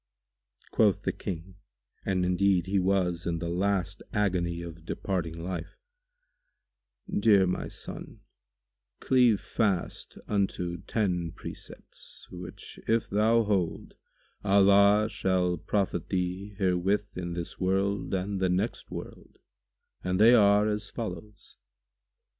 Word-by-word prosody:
Quoth 105 -4 +3
the - - +1
King, 90 +2 -6 0.5
and 90 -2 0
indeed 90 -1 +2
he 95 +1 +1
was 90 -2 +1
in 85 -1 0
the 85 +1 -3
last 95 0 0
agony 90 -4 0
of 85 -1 -9
departing 85 -1 -3
life, 90 0 -5 1.3
"Dear 110 - +4
my 90 - -2
son, - - -9 0.8
cleave 125 -5 +4
fast 100 -6 -2
unto 95 -4 -1
ten 90 -6 0
precepts, - - -9
which 90 0 -9
if 115 0 +1
thou 110 +3 +4
hold, 100 -5 -1 0.5
Allah 100 +1 +5
shall 95 -4 +1
profit 95 -5 -1
thee 95 +2 -2
herewith 95 +2 0
in 85 -1 -4
this 85 0 -6
world 95 +1 0
and 95 +1 -1
the 95 -1 +2
next 95 +6 -1
world, - - -9 0.7
and 90 +1 0
they 115 +3 +8
are 105 -2 +5
as 105 -1 -2
follows. 105 -2 -7
95 Hz, 115 wpm, -28 LUFS, 90-105 Hz, 1.3 s, they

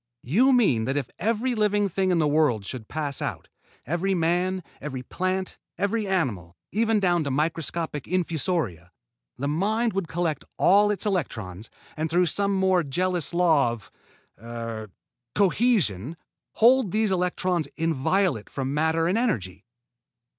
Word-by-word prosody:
"You 230 - +4
mean 190 - +3
that 135 +3 -1
if 135 -4 -3
every 230 +5 0
living 205 -2 +2
thing 190 0 0
in 180 - +2
the 155 -2 +2
world 145 -9 +2
should 110 +1 -5
pass 145 -3 -3
out, - - -4 0.4
every 175 +6 0
man, 180 +2 0 0.2
every 135 -3 -5
plant, 185 +6 -3 0.2
every 205 +1 0
animal, 110 - -2
even 220 +1 +2
down 175 -4 +2
to 140 - -2
microscopic 155 +1 -2
infusoria, 160 - -1 0.5
the 140 - -2
Mind 215 +9 0
would 195 -3 -2
collect 165 -4 -2
all 205 +2 +5
its 210 0 -1
electrons, 110 - -3 0.3
and 160 +1 -2
through 175 +3 +3
some 200 +3 +1
more 190 -1 +3
jealous 175 +3 0
law 165 -7 +3
of, 115 -4 -8 0.5
er, 115 -2 -6 0.5
cohesion 175 - +1 0.4
hold 245 -1 +5
these 215 +2 +1
electrons 180 -3 0
inviolate 165 - 0
from 135 0 -3
matter 160 +2 +1
and 190 +6 +1
energy?" 100 - -2
170 Hz, 140 wpm, -25 LUFS, 135-195 Hz, 0.5 s, all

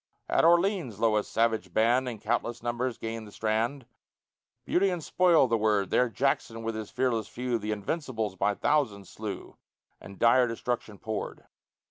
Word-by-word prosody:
At - - +2
Orleans 170 - +3
lo! 115 -1 +3
a 105 - +2
savage 110 -5 -1
band, 120 +4 +3
In 115 - -6
countless 115 +2 -2
numbers 120 0 -2
gain 115 0 -5
the 105 - -12
strand, 115 +6 -1 0.8
"Beauty 195 +2 +2
and 175 -3 -3
spoil" 170 -6 +4
the 115 -1 +1
word 105 -2 +1
There 125 -1 +3
Jackson 115 -2 -1
with 115 0 -2
his 110 -1 -6
fearless 120 -4 0
few, 125 -1 -2
The 105 +1 -3
invincibles 110 - -3
by 100 +2 +1
thousands 110 -11 0
slew, - - -7 0.4
And 100 - -12
dire 120 +2 +5
destruction 115 -2 -3
poured. 110 0 -5
115 Hz, 160 wpm, -28 LUFS, 110-130 Hz, 0.8 s, dire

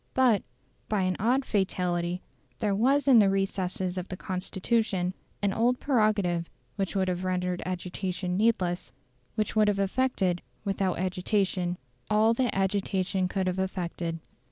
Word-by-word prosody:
But, 250 -6 +4 0.5
by 210 -3 +1
an 185 0 +1
odd 255 +5 +2
fatality, 180 -3 0 0.3
there 210 -3 0
was 270 +8 +3
in 255 -4 +8
the 200 -2 +5
recesses 190 -1 -1
of 180 - -6
the 185 - -6
Constitution 190 0 -1 0.3
an 200 -1 +2
old 245 +4 +2
prerogative 210 - +1 0.3
which 195 -1 -2
would 190 -1 +2
have 180 0 -1
rendered 180 -1 -1
agitation 180 0 -3
needless 190 -4 +1 0.4
which 215 0 -1
would 215 -1 +5
have 205 -1 +2
effected, 195 -3 +1 0.2
without 195 -2 0
agitation, 185 -1 0 0.3
all 215 +2 +4
that 245 -3 0
agitation 190 -1 0
could 190 0 -1
have 185 0 -1
effected. 175 -3 -2
190 Hz, 140 wpm, -28 LUFS, 180-215 Hz, 0.5 s, in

